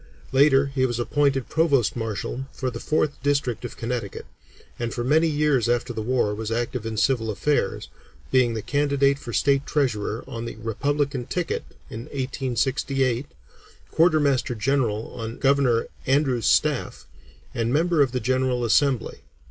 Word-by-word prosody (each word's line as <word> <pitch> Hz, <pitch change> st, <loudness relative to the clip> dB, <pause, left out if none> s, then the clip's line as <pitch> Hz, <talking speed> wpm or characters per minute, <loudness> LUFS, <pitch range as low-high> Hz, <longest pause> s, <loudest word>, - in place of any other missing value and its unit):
Later 135 Hz, 0 st, +5 dB
he 130 Hz, -1 st, +2 dB
was 120 Hz, -2 st, -3 dB
appointed 135 Hz, +1 st, +1 dB
Provost 145 Hz, -8 st, +2 dB
Marshal 115 Hz, +3 st, -4 dB
for 130 Hz, -1 st, -3 dB
the -, -, -6 dB
Fourth 150 Hz, -1 st, -1 dB
District 140 Hz, -5 st, 0 dB
of 120 Hz, -, -7 dB
Connecticut, 115 Hz, -3 st, -4 dB, 0.5 s
and 120 Hz, -1 st, -2 dB
for 120 Hz, -, -3 dB
many 155 Hz, +6 st, +3 dB
years 145 Hz, -6 st, +1 dB
after 120 Hz, 0 st, 0 dB
the 110 Hz, -, -4 dB
war 120 Hz, -2 st, 0 dB
was 110 Hz, +1 st, -4 dB
active 120 Hz, 0 st, -2 dB
in 110 Hz, -1 st, -4 dB
civil 115 Hz, 0 st, +1 dB
affairs, 110 Hz, 0 st, -1 dB, 0.4 s
being 125 Hz, -3 st, +3 dB
the 110 Hz, -, -4 dB
candidate 140 Hz, -1 st, +1 dB
for 120 Hz, -, -7 dB
State 140 Hz, +3 st, +2 dB
Treasurer 115 Hz, -6 st, -1 dB
on 115 Hz, 0 st, -6 dB
the -, -, -6 dB
Republican 135 Hz, +4 st, -2 dB
ticket 180 Hz, -2 st, -2 dB, 0.2 s
in 115 Hz, +2 st, -7 dB
1868, 130 Hz, -1 st, -1 dB, 0.6 s
Quartermaster 145 Hz, -6 st, +2 dB
General 115 Hz, -2 st, 0 dB
on 115 Hz, -1 st, -6 dB
Governor 135 Hz, -4 st, +2 dB, 0.2 s
Andrews' 130 Hz, -4 st, +2 dB
staff, -, -, +1 dB, 0.5 s
and 115 Hz, 0 st, -1 dB
member 165 Hz, +2 st, +2 dB
of 135 Hz, -3 st, +3 dB
the 125 Hz, -, -1 dB
General 130 Hz, 0 st, 0 dB
Assembly. 130 Hz, +2 st, +1 dB
130 Hz, 150 wpm, -24 LUFS, 115-140 Hz, 0.6 s, Later